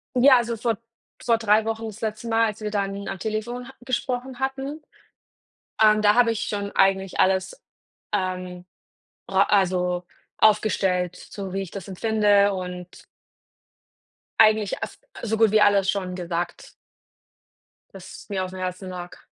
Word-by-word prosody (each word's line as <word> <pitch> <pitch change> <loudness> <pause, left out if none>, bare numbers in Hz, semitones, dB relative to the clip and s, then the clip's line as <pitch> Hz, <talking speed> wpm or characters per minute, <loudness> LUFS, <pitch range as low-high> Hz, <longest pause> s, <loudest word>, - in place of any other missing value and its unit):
Ja, 255 +1 +7
also 235 -1 -1
vor 230 -1 -1 0.5
vor 230 -2 +3
3 215 -1 +3
Wochen 225 0 -3
das 220 0 -9
letzte 215 +1 -4
Mal, 225 0 +3
als 215 0 -4
wir 210 - -2
dann 200 -1 -3
am 195 - -4
Telefon 220 +5 -4
ha 265 - -12
gesprochen 255 0 -3
hatten, 270 +3 -3 1.0
ähm, 215 0 +5
da 205 0 +6
habe 235 0 +4
ich 225 - -2
schon 200 -1 -3
eigentlich 195 -1 +2
alles, 190 0 +2 0.5
ähm, 185 -2 -3 0.6
ra 195 0 +4
also, 180 -3 +1 0.3
aufgestellt, 190 -4 +2
so 195 -1 -8
wie 195 - -1
ich 190 - -7
das 195 -2 -7
empfinde 205 0 +3
und 180 -1 -7 1.4
eigentlich 215 -2 +4
as - - -7 0.2
so 220 -1 -1
gut 225 -2 +4
wie 215 0 +4
alles 200 -2 +4
schon 185 -2 -1
gesagt 175 -1 -4 1.2
das 185 -2 -11
mir 190 -2 -1
aufm 185 0 -6
Herzen 185 +1 -4
lag. 180 -1 -8
205 Hz, 145 wpm, -24 LUFS, 185-225 Hz, 1.4 s, Ja